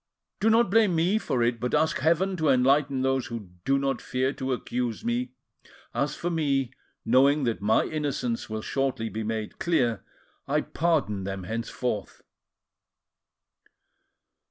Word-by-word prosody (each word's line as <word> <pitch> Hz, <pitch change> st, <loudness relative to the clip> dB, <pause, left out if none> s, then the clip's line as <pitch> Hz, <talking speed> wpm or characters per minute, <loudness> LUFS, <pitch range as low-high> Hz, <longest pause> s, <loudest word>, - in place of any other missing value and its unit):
Do 220 Hz, -, +3 dB
not 225 Hz, -3 st, +4 dB
blame 215 Hz, -5 st, +4 dB
me 180 Hz, +7 st, +2 dB
for 125 Hz, -, 0 dB
it; 120 Hz, 0 st, +1 dB
but 125 Hz, +3 st, -1 dB
ask 160 Hz, +1 st, +2 dB
Heaven 170 Hz, +6 st, +2 dB
to 155 Hz, -3 st, +1 dB
enlighten 135 Hz, +1 st, +3 dB
those 135 Hz, -1 st, +1 dB
who 110 Hz, -6 st, -7 dB
do 135 Hz, +1 st, +3 dB
not 135 Hz, -2 st, -1 dB
fear 130 Hz, +2 st, -1 dB
to 130 Hz, 0 st, -3 dB
accuse 125 Hz, -2 st, -3 dB
me. 120 Hz, +2 st, -1 dB, 0.6 s
As 140 Hz, +1 st, -1 dB
for 175 Hz, -, -3 dB
me, 140 Hz, -6 st, 0 dB, 0.3 s
knowing 135 Hz, +5 st, +4 dB
that 115 Hz, -4 st, -1 dB
my 105 Hz, +2 st, +3 dB
innocence 140 Hz, -7 st, -2 dB
will 110 Hz, 0 st, -4 dB
shortly 135 Hz, -5 st, -1 dB
be 110 Hz, -, -4 dB
made 110 Hz, 0 st, -4 dB
clear, 120 Hz, -, +1 dB, 0.4 s
I -, -, +2 dB
pardon 150 Hz, -, 0 dB
them 95 Hz, 0 st, -4 dB
henceforth." 115 Hz, +1 st, -4 dB
130 Hz, 145 wpm, -27 LUFS, 115-150 Hz, 0.6 s, not